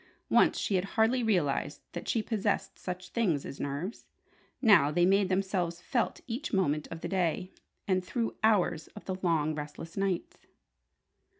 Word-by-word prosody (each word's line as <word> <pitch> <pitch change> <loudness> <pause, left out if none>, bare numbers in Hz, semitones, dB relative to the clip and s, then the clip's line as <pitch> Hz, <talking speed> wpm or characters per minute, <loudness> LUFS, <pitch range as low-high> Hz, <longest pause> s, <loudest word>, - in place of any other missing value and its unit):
Once - - +5
she - - -1
had 185 -1 +2
hardly 225 +3 +4
realized 155 -9 0
that - - -6
she 225 - +1
possessed 210 -3 -1
such 180 0 -5
things 180 -12 0
as 135 - -7
nerves. 145 +10 -4 0.5
Now 205 - +6
they 175 +4 +3
made 195 +1 +3
themselves 185 -3 0
felt 235 +6 -1
each 250 +5 -4
moment 155 -6 +1
of 165 0 -7
the - - -3
day, 180 -1 0 0.4
and 185 -2 +2
through 230 +4 -2
hours 190 -7 +2
of 210 - -10
the 190 -1 -3
long, 160 -3 +1
restless 150 +2 -7
nights. 195 -3 -2
185 Hz, 160 wpm, -30 LUFS, 165-210 Hz, 0.5 s, Now